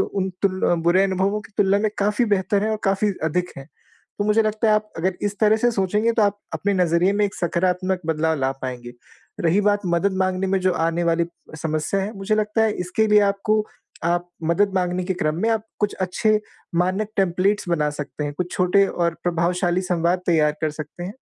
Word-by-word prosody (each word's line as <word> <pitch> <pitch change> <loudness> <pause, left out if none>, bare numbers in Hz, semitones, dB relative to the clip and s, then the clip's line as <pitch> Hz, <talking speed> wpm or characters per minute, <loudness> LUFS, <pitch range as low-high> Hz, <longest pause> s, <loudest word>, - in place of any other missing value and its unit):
उन 190 -1 -1
तुल 190 -2 0
अ, - - +4
बुरे 170 +3 +3
अनुभवों 195 +2 0
की 210 - -16
तुलना 200 0 +4
में 215 +1 0
काफ़ी 210 +4 +2
बेहतर 200 +1 0
हैं 220 - 0
और 215 - -1
काफ़ी 195 +1 +1
अधिक 180 +3 -1
हैं। 135 - -10 0.5
तो 205 - 0
मुझे 215 +2 +3
लगता 215 +1 0
है 215 - +5
आप 215 0 -1
अगर 185 +3 0
इस 205 0 -2
तरह 215 0 +5
से 240 +2 +2
सोचेंगे 210 +3 +1
तो 225 - +2
आप 205 0 +1 0.2
अपने 200 0 0
नज़रिए 175 +3 +2
में 210 +1 +2
एक 200 - -3
सकारात्मक 180 +1 0
बदलाव 160 0 0
ला 135 0 +1
पाएँगे। 120 -2 -5 0.5
रही 170 +4 +3
बात 205 0 +2
मदद 180 +3 +1
माँगने 185 0 0
में 190 0 +1
जो 185 0 +2
आने 165 +1 0
वाली 170 0 +2 0.3
समस्या 155 +4 -1
है, 200 +3 -3
मुझे 195 +2 0
लगता 215 +1 +1
है 220 - +2
इसके 180 +5 0
लिए 210 0 +6
आपको 205 +2 +1 0.4
आप 175 +1 0 0.2
मदद 195 +5 +2
माँगने 180 -1 0
के 190 +1 -1
क्रम 155 -3 -1
में 225 - +2
आप 220 -1 +1 0.2
कुछ 210 - 0
अच्छे 210 +4 +1 0.3
मानक 185 +5 0
टेम्पलेट्स 195 +1 +1
बना 155 -4 +1
सकते 150 0 -5
हैं। 145 - -3
कुछ 180 +1 -3
छोटे 190 +2 +3
और 170 -3 -1
प्रभावशाली 175 +1 0
संवाद 180 0 0
तैयार 155 -3 +3
कर 155 - 0
सकते 155 +3 -8
हैं, 190 - -5
185 Hz, 210 wpm, -22 LUFS, 170-205 Hz, 0.5 s, लिए